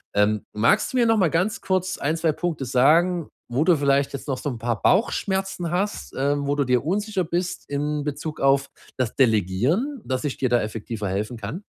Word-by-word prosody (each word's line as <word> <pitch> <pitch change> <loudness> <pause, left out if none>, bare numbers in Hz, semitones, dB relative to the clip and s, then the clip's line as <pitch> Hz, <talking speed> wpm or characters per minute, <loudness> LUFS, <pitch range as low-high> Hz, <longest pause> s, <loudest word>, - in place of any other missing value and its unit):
Ähm, 105 +1 +2
magst 105 - +2
du - - 0
mir 240 - +4
noch 225 -1 +4
mal 180 -5 +3
ganz 180 +7 0
kurz 185 -1 -1
1, 155 +3 0
2 160 -1 +2
Punkte 160 -4 -3
sagen, 160 +7 +3 0.2
wo 130 +5 +2
du 175 - +5
vielleicht 140 -1 +2
jetzt 140 - -6
noch 130 - -1
so 145 - -3
'n 120 - -6
paar 115 0 -2
Bauchschmerzen 190 -4 +1
hast, 195 +4 -2
ähm, 140 +1 0
wo 145 - +1
du 140 - +1
dir 125 +2 +1
unsicher 200 +1 0
bist 175 +2 -3
in 145 +1 -1
Bezug 150 +1 -5
auf 135 0 +3 0.3
das 125 -3 -1
Delegieren, 130 - +1
dass 130 +2 -2
ich 145 - -2
dir 130 - 0
da 120 -1 +3
effektiver 110 -1 -4
helfen 105 +6 -2
kann? 115 - -6
145 Hz, 205 wpm, -23 LUFS, 125-180 Hz, 0.3 s, du